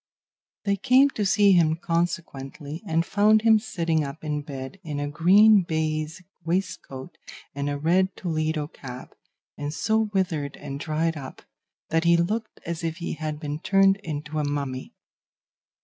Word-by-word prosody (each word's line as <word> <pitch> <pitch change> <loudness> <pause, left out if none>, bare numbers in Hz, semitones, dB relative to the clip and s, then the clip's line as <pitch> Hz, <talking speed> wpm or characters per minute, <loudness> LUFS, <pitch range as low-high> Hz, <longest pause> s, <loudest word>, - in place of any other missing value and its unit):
They 200 -1 +1
came 270 +4 +5
to 210 -5 -1
see 200 +1 +5
him 165 -4 +4
consequently, 165 -3 -3
and 165 0 +1
found 210 +3 +4
him 220 -1 +6
sitting 165 -7 -1
up 140 +3 -7
in 150 -1 -2
bed 140 +4 -8
in 150 -4 -4
a 145 - -2
green 195 +8 +6
baize 160 0 -2 0.2
waistcoat 165 -6 -4 0.3
and 140 +1 -2
a 145 - -2
red 180 +6 +2
Toledo 155 -3 -1
cap, 130 -4 -10 0.5
and 145 0 -3
so 220 +6 +1
withered 160 -8 -1
and 140 -1 -6
dried 160 +1 -1
up 135 -2 -9 0.5
that 165 +1 +1
he 170 0 +5
looked 215 +6 -2
as 170 0 -4
if 165 0 -2
he 170 - -4
had 155 -1 -4
been 150 -1 -4
turned 195 +2 +4
into 155 -4 -5
a - - 0
mummy. 140 -3 -4
160 Hz, 155 wpm, -25 LUFS, 150-190 Hz, 0.5 s, him